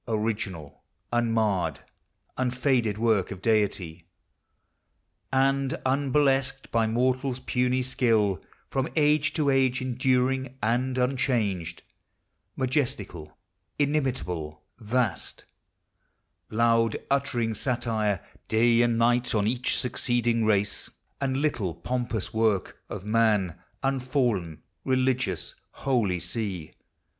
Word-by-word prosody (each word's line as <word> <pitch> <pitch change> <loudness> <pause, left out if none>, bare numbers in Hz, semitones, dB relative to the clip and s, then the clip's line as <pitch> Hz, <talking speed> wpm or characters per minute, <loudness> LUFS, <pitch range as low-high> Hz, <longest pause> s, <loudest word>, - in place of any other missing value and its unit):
original, 105 -9 -3 0.3
Uninarred, 110 -10 +1 0.6
unfaded 125 -4 +1
work 110 -4 +2
of 95 - -6
Deity! 95 -6 0 1.2
And 135 0 +2
unburlesqued 135 0 +1
by 115 -1 +2
mortal's 130 +3 0
puny 125 0 +1
skill; 110 -7 +1 0.3
From 135 -1 0
age 150 -1 +3
to 145 -3 +2
age 130 -1 +3
enduring, 130 +1 0
and 125 +3 0
unchanged, 115 -10 0 0.7
Majestical, 115 - -2 0.4
inimitable, 120 - -1 0.2
vast, 115 -2 -2 1.0
Loud 115 0 +2
uttering 125 -5 +1
satire, 110 -6 0 0.3
day 115 +1 +4
and 120 -1 +2
night, 120 +1 +2
on 105 -1 +2
each 120 +3 +1
Succeeding 120 -2 0
race, 105 -1 +1 0.3
and 135 -1 0
little 120 - -1
pompous 120 +2 -3
work 110 -4 0
Of 100 -1 -6
man; 105 -5 +2 0.3
unfallen, 125 - 0 0.2
religious, 130 - 0 0.2
holy 115 -10 0
sea! 95 -7 -3
120 Hz, 95 wpm, -27 LUFS, 105-130 Hz, 1.2 s, day